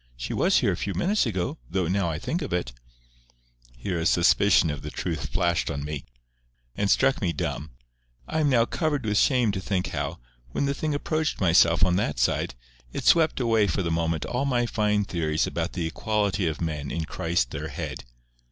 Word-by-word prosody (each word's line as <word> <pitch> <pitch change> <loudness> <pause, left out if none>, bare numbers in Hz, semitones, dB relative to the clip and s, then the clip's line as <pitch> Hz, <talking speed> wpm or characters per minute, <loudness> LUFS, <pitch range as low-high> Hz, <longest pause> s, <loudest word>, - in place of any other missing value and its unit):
She - - -4
was - - +3
here - - +2
a - - -1
few 100 - -3
minutes 200 - +1
ago—though, 90 - -2
now 95 0 +1
I 80 - -2
think 165 - -3
of 145 - -4
it—" 85 -9 -2 1.0
Here 85 +8 -3
a 80 - +1
suspicion 90 -1 +4
of 75 - -6
the - - -6
truth - - -4
flashed 85 -2 0
on 70 0 -3
me, 75 -3 -5 0.7
and 100 -1 0
struck 135 +5 +3
me 90 -4 +1
dumb. 75 -1 -3 0.6
I 160 - -1
am 150 -2 +3
now 120 -4 +4
covered 145 -2 -1
with 105 -1 +2
shame 125 -5 +3
to 95 -1 -4
think 95 -1 -1
how, - - -3 0.4
when - - 0
the 140 - 0
thing 150 +1 -2
approached 155 +1 -1
myself 85 0 +5
on 90 -1 +2
that 75 -9 -1
side, - - 0 0.4
it - - -4
swept 160 -4 +4
away 115 -4 +3
for 95 +2 -1
the 85 - -1
moment 80 -1 0
all 125 +3 -1
my 125 -3 +1
fine 105 -2 +1
theories 80 -4 0
about - - -3
the 85 - -2
equality 100 +1 0
of 80 -1 -3
men 75 -4 -3
in 85 -1 -3
Christ 80 -7 -1
their - - -4
Head. - - -6
95 Hz, 200 wpm, -26 LUFS, 80-120 Hz, 1.0 s, myself